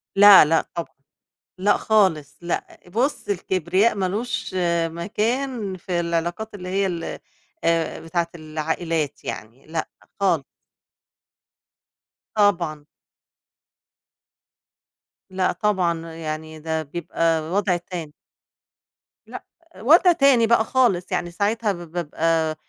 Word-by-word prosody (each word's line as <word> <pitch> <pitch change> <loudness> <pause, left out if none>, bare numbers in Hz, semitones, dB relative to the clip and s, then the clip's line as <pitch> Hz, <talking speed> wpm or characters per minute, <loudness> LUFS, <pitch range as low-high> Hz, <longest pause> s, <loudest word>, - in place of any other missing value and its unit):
لأ، 200 -4 +9
لأ، 160 +2 +1
طبعًا 170 -1 -5 0.6
لأ 205 +3 +3
خالص، 175 -10 +1
لأ، 170 0 -4
بُصّ 235 +3 -1
الكبرياء 190 +2 +1
ما 195 - -1
لوش 210 0 -3 0.3
مكان 215 +5 -2
في 175 0 -2
العلاقات 170 +6 -2
اللي 180 -2 -7
هي 195 +1 +1
ال 170 -3 -4 0.4
آآ 165 -1 +1
بتاعة 170 +1 -2
العائلات 155 -1 -3
يعني، 115 +5 -7
لأ 160 0 -3 0.3
خالص. 175 -7 +2 1.9
طبعًا. 170 -8 +1 2.4
لأ، 185 0 0
طبعًا 170 -4 -1
يعني 155 -1 -6
ده 160 0 -2
بيبقى 165 +1 -1
وضع 190 -2 +1
تاني. 170 -3 -7 1.1
لأ، - - -8 0.3
وضع 330 - +6
تاني 275 -7 +4
بقى 235 -1 +4
خالص 215 -9 +1
يعني 175 - -1
ساعتها 210 +3 0
ب 175 -3 -8
بابقي 165 -1 0
175 Hz, 105 wpm, -23 LUFS, 165-205 Hz, 2.4 s, لأ